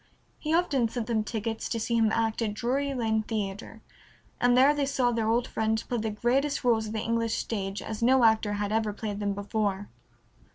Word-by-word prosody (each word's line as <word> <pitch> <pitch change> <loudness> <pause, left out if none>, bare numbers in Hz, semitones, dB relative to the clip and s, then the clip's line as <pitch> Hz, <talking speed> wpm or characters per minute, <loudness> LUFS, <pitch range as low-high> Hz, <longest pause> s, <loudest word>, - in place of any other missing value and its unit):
He 305 - -3
often 295 -9 +2
sent 235 -1 -3
them 225 -2 0
tickets 225 0 -3
to 230 - -2
see 235 +1 -1
him 225 -2 +3
act 225 0 0
at 210 -2 -1
Drury 270 +5 -1
Lane 220 -3 +1
Theatre, 215 0 -5 0.6
and 245 0 +4
there 270 +3 +6
they 290 -2 -1
saw 255 -3 +1
their 225 -2 -1 0.2
friend 220 -2 -1
play 245 - -1
the 220 0 -2
greatest 260 +8 0
rôles 225 -3 +2
of 215 - -6
the 220 - -2
English 230 0 0
stage 195 -2 -3
as 220 0 -6
no 255 +2 +4
actor 220 -2 +3
had 205 0 -2
ever 220 -1 0
played 205 -1 -5
them 200 -1 -1
before. 205 -1 -2
225 Hz, 200 wpm, -28 LUFS, 215-245 Hz, 0.6 s, there